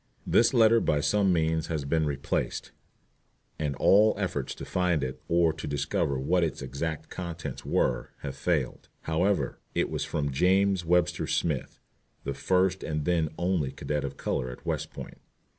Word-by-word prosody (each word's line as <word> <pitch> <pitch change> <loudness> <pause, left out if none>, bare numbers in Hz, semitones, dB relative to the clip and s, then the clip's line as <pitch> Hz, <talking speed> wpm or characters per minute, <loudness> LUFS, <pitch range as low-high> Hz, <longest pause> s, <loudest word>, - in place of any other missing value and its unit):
* - - -36
*This 115 - +4
letter 115 -2 +5
by 75 -8 +1
some 100 +5 +2
means 80 -1 +1
has 80 -4 -2
been 80 +1 +1
misplaced, 70 -1 -2 0.9
and 75 -3 -1
all 105 +8 +5
efforts - - -2
to - - -7
find 90 -5 +1
it, 65 0 -4
or 85 -1 +3
to 80 - -7
discover 70 0 0
what 85 +7 +2
its 75 -4 -2
exact 80 +4 -4
contents 85 -3 -5
were, 65 0 0
have 70 -1 -5
failed. 75 -8 -1
However, 80 -3 0 0.2
it - - +1
was - - -1
from 70 -1 -2
James 95 +5 +3
Webster 90 +1 +1
Smith, 75 -6 -1 0.4
the 70 - -2
first 90 +6 +1
and 75 -2 -2
then 85 -3 +2
only 90 -6 0
cadet 75 -1 -3
of 70 0 -5
color 65 - -2
at 60 - -10
West - - -2
Point. - - -9
80 Hz, 165 wpm, -28 LUFS, 70-90 Hz, 0.9 s, letter